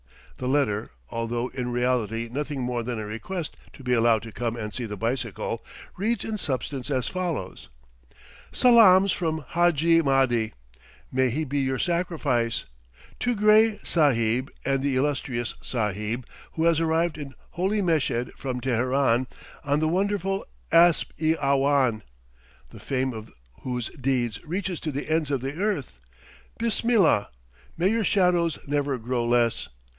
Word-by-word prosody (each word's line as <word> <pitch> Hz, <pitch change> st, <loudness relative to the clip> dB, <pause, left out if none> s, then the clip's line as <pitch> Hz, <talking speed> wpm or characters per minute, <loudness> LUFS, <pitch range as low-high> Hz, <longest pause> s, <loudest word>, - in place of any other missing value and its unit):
The 125 Hz, -, -3 dB
letter, 130 Hz, -7 st, +1 dB, 0.2 s
although 120 Hz, +2 st, -2 dB
in 125 Hz, -2 st, -4 dB
reality 120 Hz, -2 st, 0 dB
nothing 145 Hz, 0 st, -3 dB
more 125 Hz, -1 st, -1 dB
than 120 Hz, 0 st, -4 dB
a 110 Hz, -, -4 dB
request 145 Hz, -, -5 dB, 0.2 s
to 135 Hz, -, -13 dB
be 125 Hz, 0 st, +1 dB
allowed 115 Hz, -2 st, +3 dB
to 115 Hz, -, -8 dB
come 115 Hz, +2 st, -3 dB
and 105 Hz, -3 st, -5 dB
see 120 Hz, -3 st, -4 dB
the 105 Hz, -1 st, -6 dB
bicycle, 115 Hz, -1 st, -3 dB, 0.3 s
reads 215 Hz, +3 st, -1 dB
in 215 Hz, -1 st, -3 dB
substance 135 Hz, -2 st, -3 dB
as 130 Hz, -3 st, 0 dB
follows: 165 Hz, -, -4 dB, 0.8 s
"Salaams 200 Hz, -6 st, +6 dB
from 160 Hz, -3 st, -2 dB
Hadji 165 Hz, -1 st, +3 dB
Mahdi 130 Hz, -6 st, +2 dB, 0.6 s
may 130 Hz, 0 st, +2 dB
he 155 Hz, +6 st, -2 dB
be 145 Hz, +1 st, -1 dB
your 130 Hz, -1 st, 0 dB
sacrifice! 150 Hz, -9 st, 0 dB, 0.5 s
to 245 Hz, -1 st, 0 dB
Gray 215 Hz, +1 st, +5 dB
Sahib 130 Hz, -5 st, +2 dB, 0.2 s
and 135 Hz, -1 st, +1 dB
the 140 Hz, -1 st, 0 dB
illustrious 130 Hz, -4 st, -1 dB
Sahib 110 Hz, +1 st, -2 dB, 0.3 s
who 160 Hz, -, -1 dB
has 165 Hz, -1 st, +4 dB
arrived 165 Hz, 0 st, +1 dB
in 140 Hz, -3 st, -8 dB, 0.2 s
Holy 195 Hz, +4 st, 0 dB
Meshed 145 Hz, -8 st, 0 dB
from 130 Hz, -2 st, -4 dB
Teheran, 130 Hz, 0 st, +1 dB, 0.4 s
on 145 Hz, 0 st, +1 dB
the 155 Hz, -, +1 dB
wonderful 195 Hz, +2 st, 0 dB, 0.3 s
asp 170 Hz, 0 st, +5 dB
i 160 Hz, 0 st, +3 dB
awhan, 135 Hz, -4 st, +2 dB, 0.7 s
the -, -, -12 dB
fame 130 Hz, -1 st, -1 dB
of 110 Hz, 0 st, -9 dB, 0.3 s
whose 125 Hz, -2 st, -3 dB
deeds 125 Hz, -4 st, -2 dB
reaches 180 Hz, +1 st, -3 dB
to 155 Hz, -, -3 dB
the 140 Hz, +1 st, -4 dB
ends 160 Hz, -2 st, +1 dB
of 140 Hz, -3 st, 0 dB
the 135 Hz, +2 st, -3 dB
earth. 150 Hz, -, -2 dB, 0.6 s
Bismillah! 225 Hz, -, +2 dB, 0.5 s
May 175 Hz, +3 st, +3 dB
your 225 Hz, +1 st, +1 dB
shadows 175 Hz, -5 st, +2 dB
never 145 Hz, -1 st, 0 dB
grow 120 Hz, +1 st, -2 dB
less! 120 Hz, -1 st, +1 dB
135 Hz, 145 wpm, -25 LUFS, 120-165 Hz, 0.8 s, Salaams